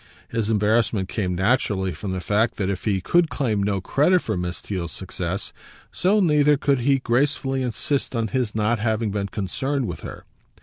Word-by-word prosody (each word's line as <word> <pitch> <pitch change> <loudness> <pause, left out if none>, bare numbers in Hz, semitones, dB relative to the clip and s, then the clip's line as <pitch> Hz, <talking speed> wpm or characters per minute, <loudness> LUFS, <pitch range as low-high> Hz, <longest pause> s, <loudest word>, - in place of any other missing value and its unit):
His 115 -2 -1
embarrassment 110 -2 +2
came 90 -5 -1
naturally 95 -2 +1
from 95 +5 -5
the 95 -1 -3
fact 105 +6 +1
that 100 -2 -1
if 95 - -5
he 100 -4 +1
could 170 - +3
claim 115 -9 0
no 100 -1 0
credit 165 - +2
for 110 - -2
Miss 90 0 -3
Theale's 90 -5 -4
success, 90 +1 -4 0.4
so 195 +4 +2
neither 150 -5 +4
could 140 -1 +1
he 135 +3 +3
gracefully 135 +1 0
insist 130 +2 -2
on 115 -2 0
his 125 -4 -1
not 110 +1 +1
having 110 -1 0
been 100 -1 -2
concerned 130 +8 -2
with 85 -7 -5
her. - - -9
110 Hz, 180 wpm, -23 LUFS, 95-135 Hz, 0.4 s, neither